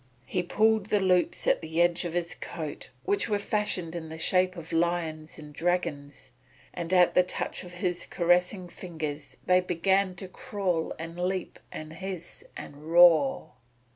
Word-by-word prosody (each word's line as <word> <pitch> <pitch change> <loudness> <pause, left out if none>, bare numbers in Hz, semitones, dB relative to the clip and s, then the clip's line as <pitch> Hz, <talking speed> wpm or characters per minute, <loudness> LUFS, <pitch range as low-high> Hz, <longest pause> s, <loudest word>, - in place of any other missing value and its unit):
He 180 - -1
pulled 215 +3 +2
the 210 - +2
loops 180 -2 +2
at - - +3
the 160 0 -3
edges 175 0 +3
of 170 - -3
his 175 0 -1
coat 160 -4 -6 0.2
which 200 - +1
were 205 - +2
fashioned 205 -5 -1
in 165 -2 -6
the 160 - -7
shape 185 +2 +2
of 165 -1 -8
lions 165 -2 -1
and 150 -2 -11
dragons, 145 -6 -2 0.4
and 170 -1 -5
at 180 -1 +5
the - - +6
touch 180 - -4
of 180 -1 -11
his 180 -1 -2
caressing 180 +2 +1
fingers 155 -5 -6
they 180 0 +5
began 185 +2 +1
to 185 +1 -6
crawl 185 -3 -2
and 165 +2 -7
leap 185 0 -2
and 155 0 -7
hiss 185 -1 -7
and 150 +3 -9
roar. 175 - +6
175 Hz, 165 wpm, -28 LUFS, 165-185 Hz, 0.4 s, the